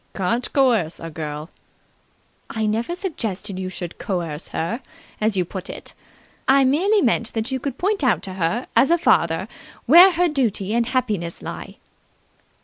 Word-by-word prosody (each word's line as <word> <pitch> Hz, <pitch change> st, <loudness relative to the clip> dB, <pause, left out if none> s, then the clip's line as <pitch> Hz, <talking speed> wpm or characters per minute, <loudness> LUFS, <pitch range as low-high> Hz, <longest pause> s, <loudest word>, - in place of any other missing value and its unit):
"Can't 230 Hz, +6 st, -1 dB
coerce 230 Hz, -, +2 dB
a 165 Hz, -, -7 dB
girl." 150 Hz, 0 st, -6 dB, 1.0 s
"I 220 Hz, -1 st, -2 dB
never 225 Hz, +10 st, -1 dB
suggested 215 Hz, -, -4 dB
that -, -, -4 dB
you 185 Hz, -, -3 dB
should 175 Hz, -2 st, -6 dB
coerce 170 Hz, -5 st, -3 dB
her, 225 Hz, +11 st, -3 dB, 0.4 s
as 215 Hz, -2 st, +1 dB
you 180 Hz, -, +2 dB
put 185 Hz, +1 st, -6 dB
it. -, -, -7 dB, 0.5 s
I 270 Hz, +1 st, +6 dB
merely 370 Hz, +11 st, +3 dB
meant 230 Hz, -2 st, +1 dB
that 225 Hz, +3 st, -2 dB
you 260 Hz, -, -1 dB
could 270 Hz, 0 st, -4 dB
point 395 Hz, -2 st, 0 dB
out 255 Hz, -, +2 dB
to 190 Hz, -, -5 dB
her, 190 Hz, +7 st, -1 dB
as 270 Hz, -, +5 dB
a 340 Hz, -, +4 dB
father, 170 Hz, -, +2 dB, 0.4 s
where 350 Hz, +8 st, +9 dB
her 350 Hz, +1 st, +2 dB
duty 225 Hz, -, 0 dB
and 235 Hz, 0 st, +1 dB
happiness 210 Hz, -10 st, -1 dB
lie." -, -, -7 dB
225 Hz, 165 wpm, -22 LUFS, 185-270 Hz, 1.0 s, where